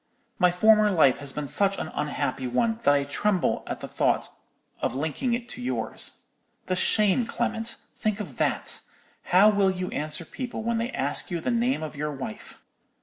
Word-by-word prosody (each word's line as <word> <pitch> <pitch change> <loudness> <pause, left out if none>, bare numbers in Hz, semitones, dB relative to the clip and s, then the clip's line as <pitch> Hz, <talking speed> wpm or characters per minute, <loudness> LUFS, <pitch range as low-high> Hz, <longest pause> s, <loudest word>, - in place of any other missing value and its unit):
'My 180 - +6
former 215 +3 +5
life 155 -9 +4
has 140 -1 -4
been 150 0 -4
such 195 +5 +1
an - - -4
unhappy 140 -4 -2
one, 225 - +1
that 145 - +4
I 140 - +2
tremble 180 +7 0
at - - -4
the - - -5
thought - - +1 0.5
of - - -1
linking 160 - -1
it 240 0 -6
to - - -7
yours. 120 -3 -3 0.4
The 185 - 0
shame, 210 +4 +2
Clement—think 225 -2 -2
of 160 - -7
that. - - +1 0.4
How 195 +4 +6
will 200 -2 +3
you 185 -1 -2
answer 155 +2 -3
people 240 +3 -5
when 230 0 0
they 230 +2 -1
ask 145 - 0
you 175 - -2
the 245 - -1
name 240 -4 +1
of 155 -1 -6
your 150 +1 -2
wife?' 135 -6 -7
185 Hz, 180 wpm, -26 LUFS, 145-220 Hz, 0.5 s, My